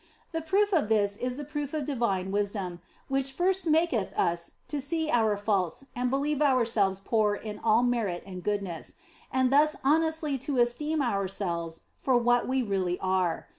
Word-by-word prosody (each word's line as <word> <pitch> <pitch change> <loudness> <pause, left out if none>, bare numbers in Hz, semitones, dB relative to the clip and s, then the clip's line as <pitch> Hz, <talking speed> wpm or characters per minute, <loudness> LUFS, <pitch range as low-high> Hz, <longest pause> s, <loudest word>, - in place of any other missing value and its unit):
The 325 -1 -2
proof 400 +5 +2
of 300 - +2
this 205 -2 +2
is 250 +3 -3
the 295 - -5
proof 295 0 -4
of 300 -3 -2
divine 200 -9 -1
wisdom, 195 -4 -2 0.3
which 270 0 0
first 370 +3 +1
maketh 310 - +1
us 170 0 0 0.2
to 295 -2 -3
see 315 +3 -1
our 220 -3 +3
faults 200 +2 -1
and 250 0 0
believe 285 +2 0
ourselves 230 -8 +2
poor 210 0 +1
in 210 0 -7
all 225 +1 +3
merit 225 -8 0
and 185 -2 -7
goodness, 195 -4 -3 0.4
and 260 0 +2
thus 300 +2 +5
honestly 315 0 +1
to 270 +1 -3
esteem 285 +6 +1
ourselves 190 -6 -2 0.2
for 260 -2 +3
what 240 0 +2
we 260 0 +1
really 190 -4 -1
are. 185 -3 0
240 Hz, 170 wpm, -28 LUFS, 200-290 Hz, 0.4 s, thus